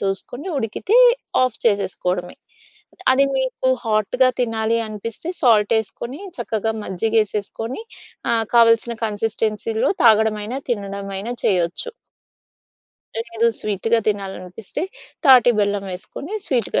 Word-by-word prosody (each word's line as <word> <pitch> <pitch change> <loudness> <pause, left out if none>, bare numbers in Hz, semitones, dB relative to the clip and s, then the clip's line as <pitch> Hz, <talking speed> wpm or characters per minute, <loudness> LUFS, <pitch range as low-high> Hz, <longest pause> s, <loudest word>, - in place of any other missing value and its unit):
చూసుకొని 225 - -3
ఉడికితే 270 - 0 0.5
ఆఫ్ 255 -3 0
చేసేసుకోవడమే. 185 -4 0 0.8
అది 275 +1 +4
మీకు 260 0 -1 0.2
హాట్‌గా 225 +4 +2
తినాలి 225 -1 0
అనిపిస్తే 220 - -6
సాల్ట్ 220 -4 +4
యేసుకొని 235 - -5 0.2
చక్కగా 220 0 -1
మజ్జిగ 220 +5 -1
ఏసేసుకొని 225 - -5 0.5
ఆహ్, 225 -1 +2
కావాల్సిన 230 0 +5
కన్సిస్టెన్సీ‌లో 220 +1 -1
తాగడమైన 220 0 +3 0.2
తినడమైన 200 -1 -4 0.2
చేయొచ్చు. 180 - +1 1.2
లేదు 230 0 0
స్వీట్‌గా 215 +3 0
తినాలనిపిస్తే, 195 - -4 0.4
తాటి 250 -3 +7
బెల్లం 205 -1 0
వేసుకొని 280 - -7
స్వీట్‌గా 240 -6 0
220 Hz, 95 wpm, -21 LUFS, 200-235 Hz, 1.2 s, తాటి